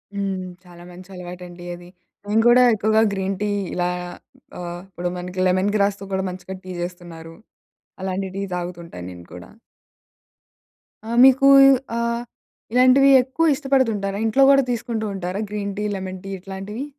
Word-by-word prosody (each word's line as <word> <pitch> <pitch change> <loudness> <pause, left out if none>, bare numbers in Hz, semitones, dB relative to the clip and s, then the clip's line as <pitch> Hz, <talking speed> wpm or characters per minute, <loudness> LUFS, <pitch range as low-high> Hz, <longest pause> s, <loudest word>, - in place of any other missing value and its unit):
హ్మ్. 195 -2 -2 0.2
చాలా 175 -1 -14
మంచి 180 +1 -13
అలవాటండి 180 0 -9
అది. 175 0 -14 0.4
నేను 215 +2 +2
కూడా 245 +1 +6
ఎక్కువగా 215 +1 +2
గ్రీన్ 195 0 -2
టీ 210 - 0 0.2
ఇలా 180 0 0 0.7
ఆహ్, 175 0 -6
ఇప్పుడు 175 -1 -4
మనకి 180 +1 -6
లెమన్ 185 +2 +1
గ్రాస్‌తో 200 -1 0
కూడా 190 0 0
మంచిగా 185 +1 -8
టీ 185 - -7
చేస్తున్నారు. 175 -2 -8 0.7
అలాంటి 190 0 -3
టీ - - -2
తాగుతుంటాను 170 - -7
నేను 85 -1 -12
కూడా. 90 - -11 1.6
ఆ! - - -7
మీకు 265 +1 +6 0.5
ఆహ్, 235 0 -1 0.5
ఇలాంటివి 255 +2 +5
ఎక్కువ 305 +5 +1
ఇష్టపడుతుంటారా? 230 -8 0
ఇంట్లో 245 +5 +3
కూడా 275 0 +5
తీసుకుంటూ 230 -2 -3
ఉంటారా? 185 +2 -4
గ్రీన్ 200 -1 -4
టీ, - - -2
లెమన్ 185 -1 -6
టీ 195 - -8
ఇట్లాంటివి? 195 +7 -7
195 Hz, 140 wpm, -22 LUFS, 180-220 Hz, 1.6 s, కూడా